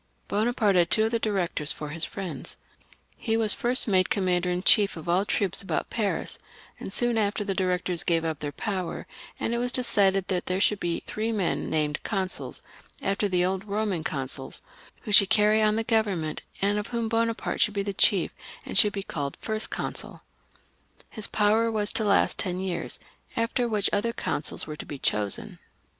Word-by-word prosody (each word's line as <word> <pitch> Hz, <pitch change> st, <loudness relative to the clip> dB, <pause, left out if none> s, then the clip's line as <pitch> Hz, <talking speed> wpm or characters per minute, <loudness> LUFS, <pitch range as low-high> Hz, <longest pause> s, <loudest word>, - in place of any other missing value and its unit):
Bonaparte 215 Hz, -1 st, +1 dB
had 175 Hz, -1 st, +4 dB
two 220 Hz, -, +3 dB
of 220 Hz, -, -1 dB
the 230 Hz, -, +1 dB
Directors 180 Hz, -8 st, 0 dB
for 150 Hz, -, -6 dB
his 160 Hz, +2 st, -1 dB
friends; 195 Hz, -3 st, -6 dB, 0.6 s
he 225 Hz, 0 st, 0 dB
was 220 Hz, -2 st, +5 dB
first 245 Hz, +1 st, 0 dB
made 185 Hz, -3 st, +3 dB
commander 180 Hz, -2 st, +1 dB
in 180 Hz, +1 st, -1 dB
chief 200 Hz, -3 st, +4 dB
of 160 Hz, -, -9 dB
all 175 Hz, +2 st, +3 dB
the 200 Hz, -, -1 dB
troops 200 Hz, -3 st, +2 dB
about 195 Hz, -, -3 dB
Paris, 215 Hz, -4 st, -1 dB, 0.4 s
and -, -, -6 dB
soon 240 Hz, +2 st, +1 dB
after 205 Hz, 0 st, 0 dB
the 200 Hz, -1 st, -2 dB
Directors 180 Hz, -2 st, 0 dB
gave 165 Hz, -3 st, +1 dB
up 160 Hz, -2 st, -2 dB
their 145 Hz, -, -4 dB
power, 190 Hz, +1 st, -4 dB, 0.3 s
and 230 Hz, -, -1 dB
it 235 Hz, -, 0 dB
was 245 Hz, +1 st, 0 dB
settled 195 Hz, -3 st, +3 dB
that 180 Hz, -2 st, -2 dB
there 185 Hz, +1 st, 0 dB
should 205 Hz, 0 st, +2 dB
be 170 Hz, -1 st, -2 dB
three 220 Hz, +2 st, -2 dB
men 200 Hz, -6 st, -1 dB
named 150 Hz, -2 st, 0 dB
Consuls, 190 Hz, -3 st, -3 dB, 0.4 s
after 200 Hz, +1 st, 0 dB
the 180 Hz, -1 st, +2 dB
old 190 Hz, +2 st, -2 dB
Eoman 200 Hz, -5 st, -1 dB
consuls, 135 Hz, -2 st, -5 dB, 0.4 s
who 210 Hz, -, -6 dB
should 200 Hz, -1 st, +7 dB
carry 210 Hz, +1 st, +4 dB
on 215 Hz, 0 st, +3 dB
the 225 Hz, -, 0 dB
Government, 205 Hz, -9 st, 0 dB, 0.2 s
and 205 Hz, +1 st, +2 dB
of 210 Hz, -, -4 dB
whomBonaparte 230 Hz, -1 st, -1 dB
should 210 Hz, -, +2 dB
be 200 Hz, -, 0 dB
the 200 Hz, 0 st, -3 dB
chief, 190 Hz, -2 st, +3 dB, 0.3 s
and -, -, 0 dB
should 210 Hz, -2 st, +5 dB
be 195 Hz, -, -3 dB
called 145 Hz, -7 st, -4 dB
First 215 Hz, 0 st, -1 dB
Consul -, -, -5 dB, 0.9 s
His 215 Hz, -3 st, -4 dB
power 220 Hz, +2 st, +2 dB
was 210 Hz, -2 st, +2 dB
to 220 Hz, -, +2 dB
last 200 Hz, -1 st, +2 dB
for -, -, 0 dB
ten 180 Hz, -1 st, -2 dB
years, 185 Hz, -2 st, -2 dB, 0.4 s
after 235 Hz, +2 st, 0 dB
which 210 Hz, -3 st, +1 dB
other 230 Hz, +3 st, +1 dB
consuls 150 Hz, -, -3 dB
were 150 Hz, -1 st, -7 dB
to -, -, -7 dB
be 145 Hz, -, -6 dB
chosen. 105 Hz, -5 st, 0 dB
200 Hz, 190 wpm, -26 LUFS, 180-220 Hz, 0.9 s, should